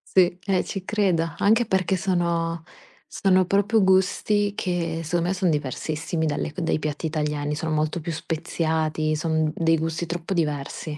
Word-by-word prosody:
Sì, 180 Hz, -1 st, +4 dB
eh, 190 Hz, -2 st, +2 dB
ci 190 Hz, -2 st, -6 dB
credo. 180 Hz, -7 st, +1 dB
Anche 225 Hz, +4 st, +4 dB
perché 190 Hz, 0 st, +1 dB
sono 170 Hz, -2 st, 0 dB, 0.5 s
sono 185 Hz, -1 st, +3 dB
proprio 205 Hz, +3 st, +2 dB
gusti 200 Hz, +2 st, +2 dB
che 170 Hz, -3 st, -2 dB
secondo 170 Hz, +2 st, 0 dB
me 185 Hz, -, +1 dB
son 185 Hz, -2 st, +1 dB
diversissimi 155 Hz, +3 st, -2 dB
dalle 150 Hz, 0 st, -2 dB
c 185 Hz, -, -5 dB
dai 165 Hz, -1 st, 0 dB
piatti 150 Hz, +1 st, -3 dB
italiani, 150 Hz, -1 st, -2 dB
sono 160 Hz, 0 st, -2 dB
molto 155 Hz, +2 st, 0 dB
più 165 Hz, +1 st, -4 dB
speziati, 160 Hz, -1 st, -1 dB
son 160 Hz, -1 st, 0 dB
dei 165 Hz, 0 st, +2 dB
gusti 165 Hz, +2 st, -2 dB
troppo 175 Hz, +2 st, -4 dB
diversi. 150 Hz, -1 st, -2 dB
165 Hz, 160 wpm, -24 LUFS, 155-185 Hz, 0.5 s, Sì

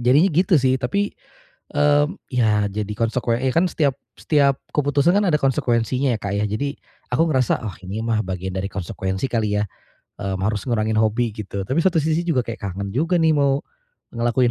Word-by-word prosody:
Jadinya 140 Hz, +10 st, +4 dB
gitu 180 Hz, +4 st, +3 dB
sih, 130 Hz, 0 st, +3 dB
tapi, 200 Hz, +12 st, -1 dB, 0.6 s
mmm, 145 Hz, +4 st, +3 dB, 0.2 s
ya 105 Hz, -4 st, +2 dB
jadi 105 Hz, 0 st, -3 dB
konsekue 115 Hz, +1 st, 0 dB
e 130 Hz, -, +1 dB
kan 180 Hz, +2 st, +4 dB
setiap 140 Hz, -6 st, +1 dB, 0.2 s
setiap 140 Hz, -3 st, +2 dB, 0.2 s
keputusan 145 Hz, +3 st, +3 dB
kan 205 Hz, -, +2 dB
ada 150 Hz, -3 st, +3 dB
konsekuensinya 130 Hz, 0 st, +1 dB
Kak, 100 Hz, 0 st, -3 dB
ya? 105 Hz, -, +1 dB
Jadi 140 Hz, +7 st, -2 dB, 0.4 s
aku 160 Hz, +7 st, +3 dB
ngerasa, 130 Hz, -5 st, +1 dB
"Oh, 95 Hz, -, -6 dB
ini 100 Hz, +4 st, -4 dB
mah 110 Hz, -2 st, +1 dB
bagian 95 Hz, 0 st, -4 dB
dari 95 Hz, +1 st, -2 dB
konsekuensi 95 Hz, +4 st, -3 dB
kali 105 Hz, -3 st, 0 dB
ya," 105 Hz, -, 0 dB, 0.6 s
mmm, 95 Hz, -1 st, -3 dB
"harus 105 Hz, -1 st, -1 dB
ngurangin 110 Hz, -2 st, 0 dB
hobi," 110 Hz, +1 st, +1 dB
gitu. 100 Hz, -2 st, -4 dB
Tapi 135 Hz, +10 st, -1 dB
satu 185 Hz, -3 st, +3 dB
sisi 160 Hz, +2 st, +1 dB
juga 130 Hz, -7 st, +2 dB
kayak 115 Hz, -1 st, -6 dB
kangen 100 Hz, 0 st, -4 dB
juga 165 Hz, +7 st, +1 dB
nih 160 Hz, -1 st, +4 dB
mau 140 Hz, 0 st, +2 dB, 0.5 s
ngelakuin 120 Hz, +1 st, +2 dB
125 Hz, 180 wpm, -22 LUFS, 105-145 Hz, 0.6 s, Jadinya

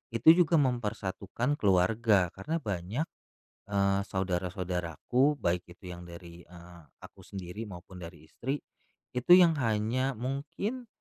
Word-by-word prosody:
itu 115 Hz, +8 st, +8 dB
juga 165 Hz, +1 st, +1 dB
mempersatukan 115 Hz, -1 st, -1 dB
keluarga, 100 Hz, 0 st, +3 dB
karena 95 Hz, +12 st, -3 dB
banyak, 100 Hz, -, -2 dB, 0.6 s
eee, 100 Hz, -1 st, +2 dB
saudara-saudaraku 90 Hz, -, 0 dB
baik 90 Hz, -2 st, 0 dB
itu 90 Hz, +1 st, -11 dB
yang 90 Hz, 0 st, -9 dB
dari, 85 Hz, 0 st, -11 dB
eee, 85 Hz, 0 st, -13 dB, 0.2 s
aku -, -, -13 dB
sendiri 95 Hz, +2 st, -6 dB
maupun 90 Hz, -1 st, -10 dB
dari 85 Hz, -2 st, -10 dB
istri, 135 Hz, +4 st, -3 dB, 0.6 s
itu 125 Hz, +7 st, 0 dB
yang 175 Hz, -3 st, +6 dB
hanya 115 Hz, +3 st, 0 dB
mungkin 155 Hz, -, -4 dB
100 Hz, 120 wpm, -30 LUFS, 90-130 Hz, 0.6 s, itu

